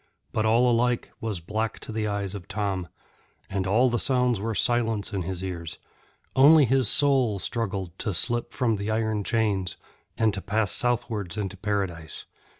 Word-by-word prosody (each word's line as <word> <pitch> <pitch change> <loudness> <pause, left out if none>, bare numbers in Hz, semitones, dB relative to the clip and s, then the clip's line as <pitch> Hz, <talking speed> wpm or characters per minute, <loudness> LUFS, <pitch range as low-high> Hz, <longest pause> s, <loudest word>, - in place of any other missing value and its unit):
But 110 0 0
all 120 +3 +4
alike 120 0 +1
was 110 -5 -2
black 110 +6 -3
to - - -6
the 110 -1 -2
eyes 100 -2 -2
of 100 -3 -8
Tom, 95 -3 -2 0.6
and 95 -1 -1
all 115 +7 +4
the 120 -1 0
sounds 125 -4 +2
were 110 +2 -3
silence 115 -3 +1
in 95 - -1
his 90 +1 -4
ears; 85 -4 -4 0.6
only 145 +3 +7
his 130 -2 +3
soul 135 -7 +3
struggled 95 -4 -3
to 105 - -1
slip 120 +6 +1
from 115 -4 0
the 100 +2 -4
iron 110 -1 0
chains 100 -5 0 0.4
and 110 -2 +2
to 95 - -4
pass 105 +1 0
southwards 115 -6 0
into 100 -2 -3
Paradise. 95 -6 -3
110 Hz, 165 wpm, -26 LUFS, 95-120 Hz, 0.6 s, only